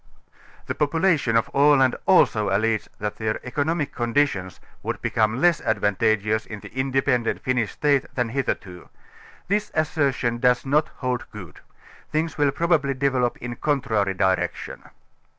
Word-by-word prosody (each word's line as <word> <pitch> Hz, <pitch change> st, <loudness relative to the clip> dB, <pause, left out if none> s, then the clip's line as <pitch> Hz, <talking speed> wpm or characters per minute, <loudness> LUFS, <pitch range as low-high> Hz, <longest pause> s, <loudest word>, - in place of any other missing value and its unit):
The -, -, -3 dB
population 150 Hz, -6 st, +1 dB
of 115 Hz, -, -1 dB
Aland 140 Hz, -2 st, +4 dB
also 105 Hz, -2 st, +4 dB
allege 110 Hz, +2 st, 0 dB
that 105 Hz, 0 st, -4 dB
their 110 Hz, -1 st, -2 dB
economic 145 Hz, +3 st, -1 dB
conditions 120 Hz, -, -1 dB, 0.2 s
would -, -, -4 dB
be -, -, -3 dB
come 110 Hz, +2 st, +1 dB
less 175 Hz, +2 st, +3 dB
advantageous 110 Hz, 0 st, 0 dB
in 110 Hz, -, -7 dB
the -, -, -10 dB
independent 130 Hz, -2 st, 0 dB
Finnish 125 Hz, -4 st, 0 dB
State 145 Hz, -3 st, +1 dB
than 125 Hz, -2 st, 0 dB
hitherto. 105 Hz, -8 st, -4 dB, 0.6 s
This 210 Hz, +2 st, 0 dB
assertion 140 Hz, -6 st, 0 dB
does 125 Hz, +1 st, +2 dB
not 150 Hz, +3 st, +2 dB
hold 125 Hz, -2 st, -3 dB
good: 90 Hz, -6 st, -11 dB, 0.5 s
things 155 Hz, 0 st, -1 dB
14 145 Hz, -1 st, +1 dB
will -, -, +2 dB
probably 150 Hz, -3 st, +1 dB
develope 130 Hz, -2 st, 0 dB
in 125 Hz, -, -6 dB
a -, -, -6 dB
contrary 110 Hz, -10 st, 0 dB
direction. 95 Hz, -2 st, -1 dB
125 Hz, 145 wpm, -23 LUFS, 110-145 Hz, 0.6 s, Aland